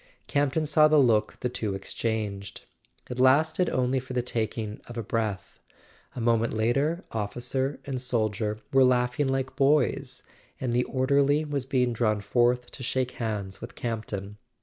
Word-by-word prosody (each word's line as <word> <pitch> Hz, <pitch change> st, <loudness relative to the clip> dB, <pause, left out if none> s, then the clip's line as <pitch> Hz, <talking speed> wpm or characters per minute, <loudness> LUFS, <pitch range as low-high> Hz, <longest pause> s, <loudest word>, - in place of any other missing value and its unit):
Campton 145 Hz, +2 st, +1 dB
saw 155 Hz, +1 st, +5 dB
the 155 Hz, 0 st, +4 dB
look 115 Hz, -6 st, +3 dB
the -, -, 0 dB
two 110 Hz, -5 st, -3 dB
exchanged: 100 Hz, -2 st, -4 dB, 0.4 s
it 125 Hz, -, -6 dB
lasted 155 Hz, +7 st, +4 dB
only 130 Hz, +1 st, +1 dB
for 130 Hz, 0 st, -8 dB
the 125 Hz, -1 st, 0 dB
taking 110 Hz, -2 st, -3 dB
of 120 Hz, -, -9 dB
a 115 Hz, -, -2 dB
breath; 110 Hz, -3 st, -3 dB, 0.6 s
a -, -, -5 dB
moment 115 Hz, 0 st, +2 dB
later 140 Hz, -, +1 dB
officer 125 Hz, +6 st, -2 dB
and 130 Hz, -3 st, -3 dB
soldier 110 Hz, -3 st, -1 dB, 0.2 s
were 135 Hz, 0 st, +6 dB
laughing 125 Hz, +2 st, +2 dB
like 135 Hz, 0 st, -1 dB
boys, 140 Hz, -1 st, +1 dB, 0.4 s
and 125 Hz, -2 st, -1 dB
the 125 Hz, +1 st, +2 dB
orderly 140 Hz, +3 st, +2 dB
was 145 Hz, -3 st, -2 dB
being 125 Hz, -3 st, +1 dB
drawn 110 Hz, -2 st, +1 dB
forth 120 Hz, +3 st, +1 dB
to -, -, -10 dB
shake 130 Hz, 0 st, -1 dB
hands 105 Hz, -4 st, -3 dB
with 115 Hz, -, -8 dB
Campton. 105 Hz, -3 st, -4 dB
125 Hz, 155 wpm, -27 LUFS, 110-135 Hz, 0.6 s, were